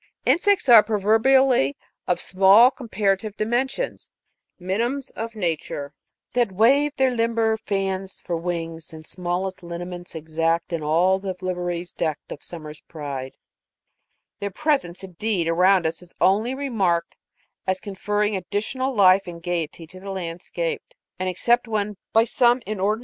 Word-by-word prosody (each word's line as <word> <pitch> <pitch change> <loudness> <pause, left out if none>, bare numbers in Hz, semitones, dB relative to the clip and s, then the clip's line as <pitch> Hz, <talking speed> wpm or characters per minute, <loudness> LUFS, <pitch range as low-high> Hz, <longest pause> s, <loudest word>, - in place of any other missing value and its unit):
Insects 400 0 +3
are 235 -3 +10
proverbially 220 - +3 0.3
of 180 - +1
small 195 +6 +6
comparative 210 -4 -1
dimensions 250 - -2 0.5
4 180 - -16
minims 240 +8 -1
of 225 0 -6
nature' 160 -6 -3 0.4
that 240 -4 +2
wave 275 +9 +3
their 265 -1 +3
limber 230 -2 +1
fans 195 -3 -3
For 175 - -3
wings, 165 -1 -4
and 155 0 -10
smallest 180 +2 -3
lineaments 175 0 -7
exact, 165 +2 -1
In 165 - -1
all 175 +5 +2
the 190 -1 -4
liveries 180 -1 -3
deck'd 155 -3 -3
of - - -7
summer's 155 -3 -8
pride 140 -4 -6 0.5
;' - - -52
their 200 - -3
presence, 195 - -1
indeed, 185 -1 -2
around 180 +2 +4
us, 160 +2 -2
is 180 -1 -16
only 215 +7 +2
remarked 195 - 0 0.5
as 190 0 0
conferring 205 +1 -1
additional 215 +8 -2
life 195 -1 +5
and 170 -1 -7
gayety 170 -1 -3
to 185 +3 -13
the 195 +1 -8
landscape; 190 - -4 0.4
and 185 0 -1
except 240 +7 +2
when, 210 -2 -2 0.2
by 225 - +5
some 240 +1 +3
inordinate 210 0 0
26. - - -11
190 Hz, 145 wpm, -23 LUFS, 175-225 Hz, 0.5 s, are